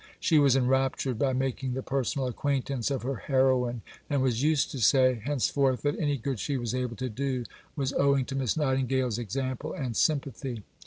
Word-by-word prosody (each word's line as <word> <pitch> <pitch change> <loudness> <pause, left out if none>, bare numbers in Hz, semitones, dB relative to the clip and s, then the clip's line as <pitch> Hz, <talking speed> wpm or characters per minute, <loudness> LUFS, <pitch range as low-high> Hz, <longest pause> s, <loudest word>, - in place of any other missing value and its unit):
She 160 -3 +3
was 140 -3 +5
enraptured 130 -1 +1
by 135 -2 +2
making 130 0 -2
the 130 - -3
personal 135 0 -1
acquaintance 135 0 -1
of 135 -4 -2
her 135 0 -2
heroine, 130 -3 +1 0.3
and 140 -3 +1
was 125 -2 +1
used 150 0 +2
to 140 - -5
say 130 +1 +4
henceforth 135 -1 +1
that 145 0 +2
any 145 -3 +1
good 130 -1 -3
she 140 +4 -1
was 120 -2 -3
able 125 -2 -2
to 130 +3 -3
do 130 +1 -2 0.3
was 135 -3 -1
owing 140 -2 +3
to 135 - -5
Miss 130 -3 0
Nightingale's 130 -4 0
example 130 +6 -3
and 125 -5 -4
sympathy. 135 -6 -1
130 Hz, 180 wpm, -28 LUFS, 125-140 Hz, 0.3 s, was